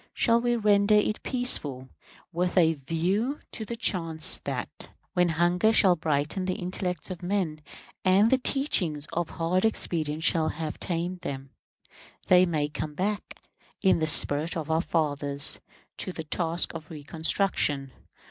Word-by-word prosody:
Shall 235 -1 +3
we 240 0 +1
render 210 -1 +3
it 210 0 +1
peaceful, 145 - -1 0.4
with 180 +2 -1
a 165 -2 +5
view 175 - -2
to 220 - -5
the 235 - -5
chance 165 -9 +1
that, - - -5 0.2
when 180 -1 +2
hunger 175 +6 +2
shall 195 -5 +4
brighten 155 +3 -1
the 185 - -1
intellects 180 -1 -4
of 185 0 -7
men, 175 -4 -2 0.4
and 195 +4 +4
the 265 - +4
teachings 185 - +2
of 175 -1 -2
hard 175 +2 -1
experience 160 -8 0
shall 160 -1 +2
have 155 -1 -5
tamed 175 +1 -3
them, 135 -4 -7 0.7
they 180 0 +5
may 155 -3 -1
come 150 0 -6
back, 200 +5 -3 0.4
in 190 -3 +4
the 155 - 0
spirit 155 +1 +4
of 160 -1 -4
our 160 +1 +2
fathers, 145 -4 0 0.4
to 185 - -1
the 160 - -6
task 165 +2 -1
of 155 -2 -9
reconstruction? 150 -2 0
175 Hz, 150 wpm, -27 LUFS, 155-195 Hz, 0.7 s, a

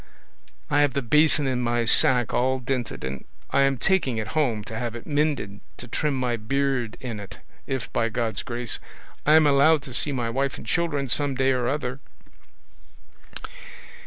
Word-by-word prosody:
I 145 - +4
have 145 -3 +2
the 140 - -1
basin 150 +3 +3
in 130 -2 -1
my 120 -1 0
sack 120 +1 +5
all 130 +2 +1
dinted, 125 - -4
and 65 0 -5 0.3
I 140 - +3
am 135 -1 +2
taking 155 -8 +1
it 110 - -3
home 125 -9 0
to 110 - -8
have 120 0 -4
it 120 - -8
mended, 145 -9 -1 0.2
to 120 - -9
trim 145 +4 -1
my 125 -2 -1
beard 125 0 -1
in 120 -5 -6
it, 100 - -10 0.3
if, 130 -3 -4
by 115 -1 +1
God's 115 -2 -2
grace, 120 -2 -3 0.5
I 150 - +6
am 160 -1 +6
allowed 145 +1 +4
to 130 - -9
see 145 +4 +2
my 120 -4 -2
wife 135 +2 -1
and - - -10
children 145 0 -1
some 140 +2 0
day 135 0 +2
or 125 -2 0
other." 135 -1 -2
130 Hz, 180 wpm, -24 LUFS, 120-140 Hz, 0.5 s, I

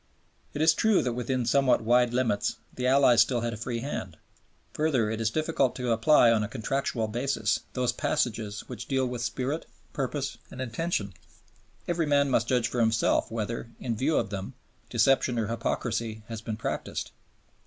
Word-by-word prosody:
It 150 - +1
is 160 +1 +6
true 220 0 +3
that 125 - -1
within 125 +1 -1
somewhat 130 0 +3
wide 120 +1 +4
limits 120 -4 0 0.2
the 125 0 -2
Allies 130 -3 +6
still 120 0 +2
had 120 0 -2
a - - -4
free 115 +2 -4
hand. 95 - -5 0.6
Further, 135 -9 +1
it 110 0 -3
is 110 - +2
difficult 155 -1 0
to 125 -2 -2
apply 115 +1 +5
on 110 -2 +3
a 105 - -1
contractual 115 +1 -2
basis 115 -1 0
those 125 -1 +1
passages 110 -8 -1
which 115 - -8
deal 130 -1 +1
with 125 -1 -4
spirit, 130 +6 -2 0.3
purpose, 140 0 -3
and 130 - -10
intention; 120 - -2 0.7
every 170 -2 0
man 140 -1 +3
must 120 -1 +2
judge 125 -2 +2
for 120 - -3
himself 115 -1 +2
whether, 115 +1 -4
in 120 -3 -2
view 140 +8 +1
of 100 - -1
them, 100 +5 -5 0.3
deception 125 +1 +3
or 115 - +1
hypocrisy 115 0 -2
has 115 -2 -5
been 110 -1 -4
practised. - - -4
120 Hz, 175 wpm, -28 LUFS, 115-135 Hz, 0.7 s, is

